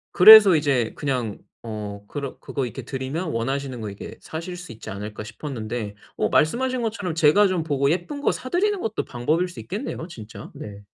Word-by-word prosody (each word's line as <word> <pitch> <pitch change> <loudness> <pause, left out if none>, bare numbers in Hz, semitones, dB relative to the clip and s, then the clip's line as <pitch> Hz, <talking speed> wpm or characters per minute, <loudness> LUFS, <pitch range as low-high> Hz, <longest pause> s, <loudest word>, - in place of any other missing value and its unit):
그래서 205 -1 +10
이제 140 -7 +1
그냥 125 -7 -2 0.2
어 105 -2 -6
그러 140 +1 -5
'그거 135 -3 -3
이렇게 125 +2 -7
드리면 135 +7 -4
원하시는 130 +1 -2
거 110 - -4
이렇게 100 - -9
사실 165 +3 -6
수 175 - -9
있지 115 - -10
않을까?' 105 +2 -6
싶었는데 110 -2 -5 0.2
어 - - +1
말씀하신 255 +10 +2
것처럼 205 -7 -3
제가 165 +6 +5
좀 185 -3 -1
보고 140 -3 +1
예쁜 180 - -2
거 - - +3
사 255 - -6
드리는 400 +6 +1
것도 220 -9 -3
방법일 155 +9 0
수 175 - -10
있겠네요 200 - -5
진짜. 110 - -10
네. 100 -1 -9
140 Hz, 390 characters per minute, -24 LUFS, 115-180 Hz, 0.2 s, 그래서